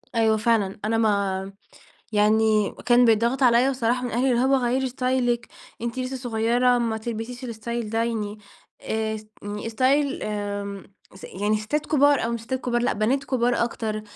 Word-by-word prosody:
أيوه 220 -1 +3
فعلًا، 215 -3 +1
أنا 225 +1 +1
ما 200 -3 0 0.6
يعني 215 0 +3
كان 245 0 +5
بيتضغط 235 +4 +2
عليَّ 245 +1 +5
بصراحة 250 -1 0
من 245 - -3
أهلي، 250 +3 +1
اللي 240 - +2
هو 270 +1 +3
"غَيّري 260 +1 0
ستايلِك 250 -2 0 0.3
أنتِ 235 +1 -3
لسه 255 +1 -3
صُغيرة، 245 0 +1
ما 230 -2 -1
تلبسيش 235 +3 -6
الستايل 235 -1 -4
ده." 225 +1 +1
يعني 215 -3 -3 0.4
آآ 220 0 -2
اس 215 0 -8 0.2
يعني 210 +2 -5
ستايل 270 +5 +1
آمم، 205 -1 -4 0.3
س 190 - -12
يعني 210 +3 -1
ستات 285 +8 -2
كبار، 285 -3 +3
أو 235 - -1
مش 235 - -3
ستات 260 +3 -4
كبار، 240 -2 -1
لأ، - - +1
بنات 250 +6 0
كبار 245 -3 +1
أكتر. 220 -2 -4
230 Hz, 170 wpm, -24 LUFS, 215-250 Hz, 0.6 s, كان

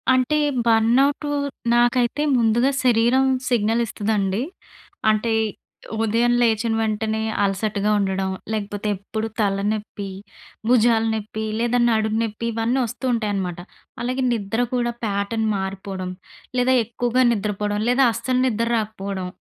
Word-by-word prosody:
అంటే 255 +4 +2 0.3
బర్న్అవుటు 245 +6 +3 0.4
నాకైతే 240 +3 +2 0.2
ముందుగా 235 +3 +3
శరీరం 245 +2 +4 0.2
సిగ్నల్ 230 -1 +2
ఇస్తదండి. 205 0 -1 0.7
అంటే 215 +1 +1 0.7
ఉదయం 230 +2 +2
లేచిన 225 -1 +2
వెంటనే 220 0 -1 0.2
అలసటగా 200 +1 0
ఉండడం, 190 -1 -1 0.2
లేకపోతే 205 0 -3
ఎప్పుడు 215 +3 -4
తలనెప్పి, 205 0 -1 0.6
భుజాల 230 -2 +4
నెప్పి, 220 0 -4
లేదా 240 +1 +1
నడుం 220 -1 +1
నెప్పి 225 +1 -4
ఇవన్నీ 230 +4 0
వస్తూ 240 +2 -6
ఉంటాయనమాట. 200 -6 -2 0.4
అలాగే 255 +2 -1
నిద్ర 225 +1 -1
కూడా 240 -1 0
ప్యాటర్న్ 210 +2 -1
మారిపోవడం, 190 -1 -4 0.5
లేదా 255 +1 +3
ఎక్కువగా 245 +2 0
నిద్రపోవడం, 205 -1 -1
లేదా 260 +2 +4
అస్సలు 250 +3 -1
నిద్ర 230 -2 0
రాకపోవడం. 200 -3 -4
220 Hz, 110 wpm, -22 LUFS, 205-240 Hz, 0.7 s, శరీరం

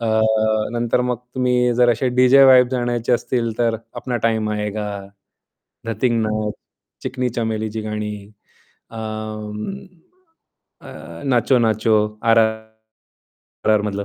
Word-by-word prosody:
अ, 115 - -2 0.7
नंतर 120 0 0
मग 125 -1 -1 0.2
तुम्ही 125 -1 +2
जर 120 0 +4
असे 120 +3 0
डीजे 130 +2 +6
वाइब्स 130 -1 +6
आणायचे 120 -1 -1
असतील 120 -1 0
तर 115 -1 +1 0.2
अपना 125 -2 -3
टाईम 110 -1 0
आयेगा, 105 0 -3 1.0
धतिंग 115 +1 0
नाच, 110 -1 -1 0.5
चिकनी 130 -1 -2
चमेलीची 110 -1 -2
गाणी, 105 0 -4 0.8
अं, 110 -1 -6 1.3
अ, - - -11
नाचो-नाचो 115 -3 +3 0.3
आर 115 -1 +4
आर 110 - +6 1.2
आर - - +4
आरमधलं. 105 -1 -1
115 Hz, 110 wpm, -20 LUFS, 110-125 Hz, 1.3 s, डीजे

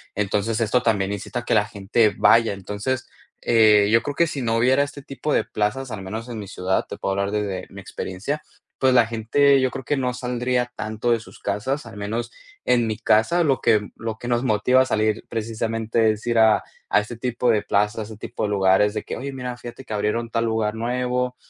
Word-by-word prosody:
Entonces, 105 +2 0
esto 115 +3 +2
también 100 -4 +1
incita 105 +4 -4
a 120 - -9
que - - +1
la 105 -1 +4
gente 105 +1 +1
vaya. 110 0 +5
Entonces, 105 +6 -4 0.3
eh, 105 -3 +5
yo 115 +1 +5
creo 145 +4 -4
que 170 - +3
si 145 -3 -4
no 115 -2 0
hubiera 130 +4 +4
este 145 0 -7
tipo 140 +2 -3
de - - +3
plazas, 110 +5 -2
al 105 - -5
menos 110 +5 -6
en 115 -2 -5
mi 100 - -7
ciudad, 95 0 -1
te - - -7
puedo 95 - -2
hablar 100 +1 -1
desde 105 -3 -3
mi 100 0 -10
experiencia, 100 +10 -4 0.4
pues 130 -1 +3
la 120 -2 +6
gente, 135 +5 +3
yo 130 -1 +1
creo - - -6
que 145 +4 -1
no 125 -2 -1
saldría 125 0 -1
tanto 110 +2 -2
de 115 - +3
sus 110 - -14
casas, 115 +8 -2
al 110 -2 -10
menos 115 +4 -3 0.3
en 120 -2 +2
mi 110 - -2
casa 165 +12 +3
lo 135 -4 +2
que 105 -1 +2
lo 115 -1 -4
que 120 - -6
nos 120 +1 +1
motiva 125 +3 +3
a - - +3
salir 110 -3 0
precisamente 115 0 0
es 110 0 -6
ir 115 -1 +2
a 110 -1 +5 0.3
a - - +5
este 110 +2 -8
tipo 125 0 -1
de 110 -2 +3
plazas, 105 +2 0
a - - -2
este - - -12
tipo - - -5
de 105 - 0
lugares, 100 +1 +3
de - - -3
que - - -5
oye, 140 +1 -5
mira, 125 -2 -5
fíjate 120 +2 -9
que 110 - -7
abrieron 105 +3 -1
tal 115 0 0
lugar 110 -1 0
nuevo, 125 +2 -1
115 Hz, 225 wpm, -23 LUFS, 105-125 Hz, 0.4 s, la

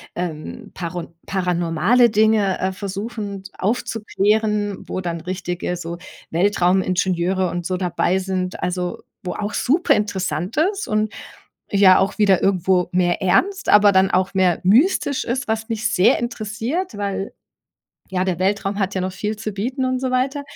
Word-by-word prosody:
ähm, 175 +6 -6
paron 170 -1 -6
paranormale 180 +5 +2
Dinge, 215 -2 +2
äh, 190 - 0
versuchen, 200 +1 -5 0.2
aufzuklären, 210 -1 0
wo 185 - -3
dann 170 -2 -4
richtige 180 0 -3
so 170 0 -6 0.3
Weltraumingenieure 185 0 +1
und 175 -1 -4
so 185 - -1
dabei 180 0 0
sind, 185 -1 -3
also, 180 0 -3 0.2
wo 180 - -3
auch 210 0 -4
superinteressant 200 - 0
ist 390 +6 +1
und 215 0 0 0.6
ja 195 -2 +6
auch 190 +1 0
wieder 200 -4 +4
irgendwo 185 -2 +2
mehr 180 0 +1
ernst, 375 - +1
aber 205 0 +7
dann 190 0 +4
auch 185 +1 +1
mehr 185 -3 +2
mystisch 270 - +3
ist, 245 +1 -2
was 220 +1 -2
mich 215 -1 -1
sehr 180 - +4
interessiert, 235 - -3
weil 200 -1 -3 0.8
ja, 185 0 0
der 185 -3 -1
Weltraum 195 +1 0
hat 195 -1 -1
ja 190 - -1
noch 185 0 -2
viel 210 +3 -3
zu 215 0 -5
bieten 250 +7 -2
und 255 0 0
so 260 -1 -1
weiter. 265 +3 0
195 Hz, 150 wpm, -21 LUFS, 180-215 Hz, 0.8 s, aber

